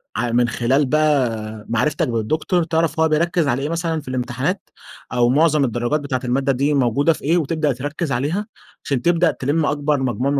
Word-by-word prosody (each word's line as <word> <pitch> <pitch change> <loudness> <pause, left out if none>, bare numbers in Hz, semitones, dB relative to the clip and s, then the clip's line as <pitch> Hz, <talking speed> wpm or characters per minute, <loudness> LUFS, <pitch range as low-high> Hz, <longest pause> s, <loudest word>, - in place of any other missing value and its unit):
ع 120 -1 -1
من 120 0 +3
خلال 130 +5 +1
بقى 125 -8 0
معرفتك 125 +6 0
بالدكتور، 155 - 0
تعرف 160 0 0
هو 160 - +4
بيركز 165 0 +1
على 130 +1 0
إيه 145 - -2
مثلًا 165 -1 -2
في 140 - -21
الامتحانات 130 - -3 0.4
أو 120 -1 +3
معظم 150 +1 +3
الدرجات 120 +5 -1
بتاعة 135 -3 -3
المادة 135 +2 +1
دي 140 +3 +1
موجودة 140 +4 +2
في - - -12
إيه، 165 +5 +2
وتبدأ 155 -2 0
تركز 145 +4 -4
عليها، 155 - -1 0.4
عشان 135 -4 -1
تبدأ 170 +1 +3
تلم 150 +4 -1
أكبر 145 0 0
مجموع 130 +2 -1
من 145 - +1
140 Hz, 185 wpm, -20 LUFS, 125-160 Hz, 0.4 s, هو